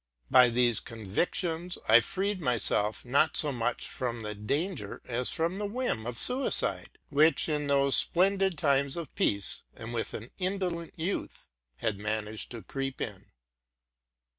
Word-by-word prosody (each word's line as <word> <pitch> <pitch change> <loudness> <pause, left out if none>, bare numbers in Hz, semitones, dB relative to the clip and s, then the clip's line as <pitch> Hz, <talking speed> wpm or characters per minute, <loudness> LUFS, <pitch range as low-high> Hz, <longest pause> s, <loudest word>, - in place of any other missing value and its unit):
By 125 -1 +7
these 120 -1 +2
convictions 160 - -3
I 110 +2 +8
freed 195 +5 -2
myself, 115 -5 0
not 140 +5 +2
so 150 - +4
much 120 -1 -2
from 120 -3 -4
the 105 0 -4
danger 120 - -3
as 125 0 -2
from 170 +3 -1
the 205 - -2
whim 210 - -2
of 120 -1 -5
suicide, 255 +2 +2
which 150 +1 +4
in 150 -2 -1
those 140 -1 +4
splendid 190 0 +2
times 140 -1 +1
of 170 -3 -6
peace, 100 -1 +1
and 115 +2 -8
with 115 - -3
an 110 +3 -8
indolent 180 -3 -3
youth, 170 +5 -4 0.3
had 100 - -2
managed 110 0 -3
to 115 -3 -9
creep 135 -1 -5
in. - - -6
140 Hz, 145 wpm, -29 LUFS, 115-175 Hz, 0.3 s, I